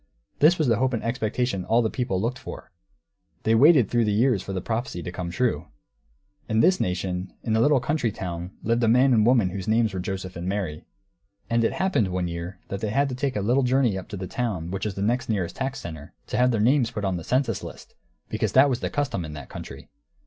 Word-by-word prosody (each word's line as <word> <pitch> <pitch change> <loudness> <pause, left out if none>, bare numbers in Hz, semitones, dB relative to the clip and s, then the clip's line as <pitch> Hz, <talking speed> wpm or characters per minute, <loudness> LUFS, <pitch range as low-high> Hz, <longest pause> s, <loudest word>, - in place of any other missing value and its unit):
This 160 +4 +6
was 155 - +1
the 115 -3 +3
hope 130 +2 +1
and 115 - -2
expectation 115 -3 -1
all 115 +5 +2
the 110 - +1
people 120 -7 -1
looked 120 +6 -2
for; - - -9 0.7
they 110 - +3
waited 135 - +6
through 120 +1 +1
the 105 - +1
years 110 -1 +2
for 100 - -6
the 95 - -2
prophecy 110 -3 -3
to 90 - -5
come 85 -1 -5
true. 120 +7 -1 0.8
In 110 0 +2
this 185 +11 +4
nation, 90 0 -2
in 110 -2 0
a - - +3
little 145 +2 +4
country 125 -3 0
town, 90 -2 -5
lived 115 +2 +1
a - - +4
man 125 +3 +5
and 110 - +4
a 115 - +4
woman 115 -8 +3
whose 95 0 -5
names 110 -1 +2
were 95 - -3
Joseph 95 -1 -5
and 85 +1 -5
Mary. 95 -7 -3 0.7
And 115 0 +3
it - - +1
happened, 185 - +1
one 90 -1 -2
year, 85 +2 -5
that 100 - -3
they 110 - -2
had 140 +5 +1
to 125 - -4
take 130 +1 -2
a 105 - 0
little 120 +7 +2
journey 125 -4 +2
up 95 - -6
to 100 - -6
the 95 - -4
town 95 -7 -3
which 95 +2 -3
was 105 -3 -3
the 100 - -2 0.2
nearest 95 -6 -1
tax 135 0 -2
centre, 80 -4 -8
to - - -3
have 125 0 +4
their 115 -3 +1
names 125 +1 +3
put 105 -4 -4
on 95 -2 0
the 85 - -6
census 125 - 0
list; - - -10 0.3
because - - -2
that 135 +2 +6
was 125 - -1
the - - -2
custom 145 -11 -2
in 75 -2 -7
that 70 -3 -9
country. - - -9
110 Hz, 245 wpm, -25 LUFS, 95-125 Hz, 0.8 s, This